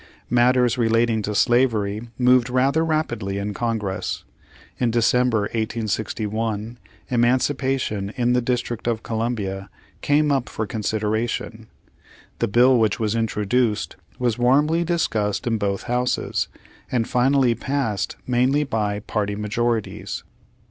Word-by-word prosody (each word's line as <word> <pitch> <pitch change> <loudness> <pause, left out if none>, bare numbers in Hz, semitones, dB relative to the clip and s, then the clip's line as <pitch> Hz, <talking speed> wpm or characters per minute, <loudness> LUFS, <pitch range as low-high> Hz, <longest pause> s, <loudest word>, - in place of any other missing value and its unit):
Matters 125 0 +3
relating 115 -1 +2
to 105 0 -3
slavery 115 -2 +2
moved 125 0 +4
rather 135 +5 +2
rapidly 120 -12 -1
in 100 +1 -3
Congress. 110 -4 -2 0.6
In 120 - +2
December, 120 0 +2
1861, 110 +1 -2 0.3
eman 120 +1 +4
cipation 130 -7 -1
in 120 0 +2
the 125 - +2
District 120 -1 -2
of 115 -2 -1
Columbia 105 -4 -3 0.3
came 150 +1 +2
up 135 -3 0
for 110 - -3
consideration. 110 +1 -2 0.7
The 115 - +1
bill 120 +4 +5
which 110 -3 +1
was 110 -2 0
introduced, 115 0 0 0.2
was 120 -2 0
warmly 150 +7 +3
discussed 115 - 0
in 115 -2 0
both 100 -1 -1
houses, 125 +1 -1 0.4
and 120 -3 0
finally 130 0 +3
passed 115 -5 -2
mainly 130 +4 +2
by 105 -6 -1
party 105 -1 -2
majorities. 110 +2 -2
115 Hz, 120 wpm, -22 LUFS, 105-125 Hz, 0.7 s, bill